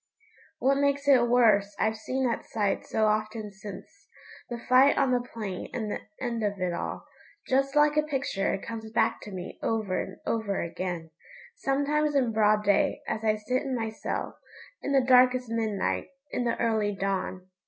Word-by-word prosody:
What 275 0 +2
makes 280 0 +1
it 255 -4 +6
worse 210 -5 +4
I've 220 0 +1
seen 260 +4 -2
that 235 - -2
sight 205 -3 -1
so 220 - +1
often 215 0 -1
since 195 0 -9 0.6
the 240 - -4
fight 255 +4 +4
on 270 -2 +3
the 250 -1 +2
plain 215 -6 -6
and 220 -4 -2
the - - -2 0.2
end 240 -3 -2
of 205 -1 -1
it 180 -1 -1
all. - - -4 0.4
Just 275 +2 +1
like 295 0 +5
a - - +6
picture 270 -9 -1
it 195 - -3
comes 220 -1 -6
back 225 0 +1
to 210 - -9
me 180 -2 -7
over 210 -5 0
and 190 - -8
over 215 -4 -1
again, 170 -1 -4 0.4
sometimes 290 +2 0
in 255 -4 +2
broad 215 -1 +3
day, 205 0 +2
as 220 - -2
I 215 -1 +3
sit 250 +5 -1
in 270 -2 -2
my 225 -2 -2
cell, 220 - -4 0.4
in 280 - -3
the 270 -2 +3
darkest 250 -1 +5
midnight, 220 -4 -1 0.2
in 245 - -1
the 235 - -1
early 220 -3 +1
dawn. 190 -1 -3
225 Hz, 180 wpm, -28 LUFS, 205-255 Hz, 0.6 s, it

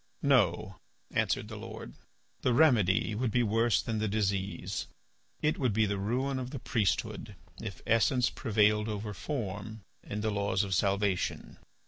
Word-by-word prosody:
"No," 100 - +2 0.3
answered - - 0
the - - -7
Lord. - - -8 0.5
"The 125 - +2
remedy 110 - +4
would 120 +3 0
be 120 +2 +2
worse 115 +1 +2
than 110 -2 -2
the 110 - 0
disease. 100 -2 -2 0.6
It 150 +1 +1
would 125 -6 +1
be 110 +1 +3
the 100 -1 -1
ruin 130 +6 -1
of 125 -1 -4
the 140 - -6
priesthood 110 -4 -1 0.3
if - - -7
essence 120 +2 +3
prevailed 105 0 +2
over 105 0 -4
form 110 -3 -5 0.2
in 105 - -5
the 110 0 0
laws 100 -1 +1
of 95 -1 -2
salvation." 100 0 0
110 Hz, 150 wpm, -30 LUFS, 100-120 Hz, 0.6 s, remedy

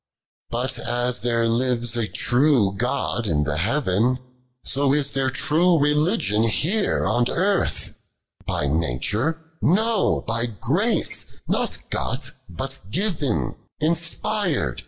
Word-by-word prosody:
34. 120 - 0 0.2
But - - -4
as 120 0 0
their 115 +1 +1
Ktcs 120 0 +1
a 115 -2 0
tnw 120 -7 +2 0.4
G«i 105 - -1
in 75 -1 +2
the 75 0 -1
Heaven, 115 - +1 0.5
So 140 0 +2
b 145 - +3
there 135 -2 0
tn:e 155 +2 +3
Ecligion 150 - +2
here 195 - +1
on 120 0 +2
Earth: 195 +2 0 0.5
Bt 75 - 0
nature? 85 - 0 0.2
Xo, 220 +5 +2
by 115 +1 0
grace, 105 -6 -1 0.2
not - - 0
got, - - -2 0.2
but 135 +10 -5
given; 145 - -1 0.3
In^pir'd. 170 - 0
125 Hz, 115 wpm, -23 LUFS, 110-155 Hz, 0.5 s, b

